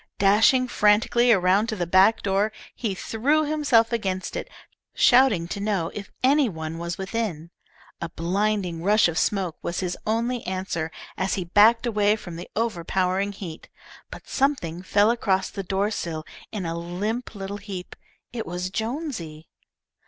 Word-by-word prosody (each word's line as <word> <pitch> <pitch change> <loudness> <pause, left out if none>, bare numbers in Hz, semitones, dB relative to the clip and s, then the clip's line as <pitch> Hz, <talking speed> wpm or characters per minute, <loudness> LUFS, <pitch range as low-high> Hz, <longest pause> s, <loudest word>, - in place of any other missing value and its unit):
Dashing 220 +6 +4
frantically 230 +3 +3
around 195 +1 +3
to 220 - -2
the 180 -4 -2
back 190 +5 +4
door, 200 +2 +1 0.2
he 215 -6 -3
threw 280 +11 +1
himself 285 -7 +2
against 190 -5 -2
it, - - -4 0.5
shouting 245 -9 +5
to 200 - -4
know 200 -5 -1
if 200 -1 -7
any 275 0 +4
one 160 -2 -6
was 170 0 -4
within. 190 -5 -3 0.5
A 170 - -3
blinding 185 0 -1
rush 210 +3 +4
of 170 -1 -1
smoke 190 -5 0
was 170 - -3
his 180 -1 -2
only 235 +2 0
answer 185 -4 -2 0.3
as 190 +1 0
he 185 - -2
backed 220 +7 +5
away 210 -2 +2
from 175 -5 -9
the 175 +2 -8
overpowering 190 -2 0
heat, 180 -5 -9 0.4
but - - -11
something 255 - 0
fell 205 +3 +3
across 195 -5 0
the 200 - -4
door 195 +2 -1
sill 165 -6 -4 0.3
in 200 -4 -4
a 165 - -2
limp 205 +8 -4
little 200 0 -5
heap. 200 -3 -8 0.4
It 230 -2 -4
was 180 +2 -4
Jonesy. 220 - -4
200 Hz, 155 wpm, -24 LUFS, 180-225 Hz, 0.5 s, shouting